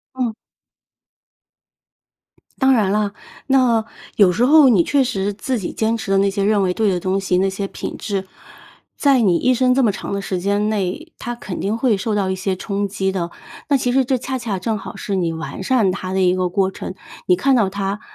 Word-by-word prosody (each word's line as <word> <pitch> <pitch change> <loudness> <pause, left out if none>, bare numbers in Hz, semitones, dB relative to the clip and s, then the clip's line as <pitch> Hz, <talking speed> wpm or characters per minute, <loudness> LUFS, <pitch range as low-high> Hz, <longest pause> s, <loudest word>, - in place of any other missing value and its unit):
嗯。 245 -4 -1 2.3
当 265 0 +5
然 215 -6 +2
了， 205 0 0 0.3
那 255 -5 +3 0.3
有 195 -4 +5
时 230 +7 +1
候 295 +1 +7
你 210 -8 +5
确 280 +9 +2
实 200 -4 -1
自 245 +5 -3
己 185 - -4
坚 225 +1 0
持 220 - -6
的 195 - +3
那 200 +1 +3
些 200 0 -2
认 210 0 +3
为 180 -1 0
对 220 +1 +1
的 180 - 0
东 190 +2 0
西， 185 -2 0
那 195 +1 +2
些 195 +1 -4
品 - - -6
质， 195 -3 -3 0.7
在 275 -3 +3
你 190 -6 +3
一 255 +7 +2
生 255 +1 +3
这 265 +1 +3
么 215 - +3
长 195 - -6
的 200 - -1
时 185 -2 -3
间 205 +3 0
内， 215 - -3
它 240 0 -5
肯 200 -6 -6
定 210 +4 -1
会 235 -4 +2
受 210 +2 -2
到 195 -2 0
一 - - 0
些 190 0 -2
冲 200 +1 -2
击 190 0 -1
的。 175 -3 -3 0.4
那 285 - +4
其 245 -2 0
实 265 +1 +3
这 255 +1 0
恰 260 +2 -4
恰 225 -6 -3
正 215 +4 -2
好 200 - -8
是 200 - -4
你 175 -3 0
完 160 +3 -6
善 215 -3 +2
它 185 -1 -5
的 190 - 0
一 180 -1 +3
个 185 -1 0
过 190 +1 +1
程， 185 - -7 0.3
你 180 - +4
看 270 +8 +2
到 215 -6 +2
它 200 +1 -3
205 Hz, 240 characters per minute, -20 LUFS, 190-240 Hz, 2.3 s, 候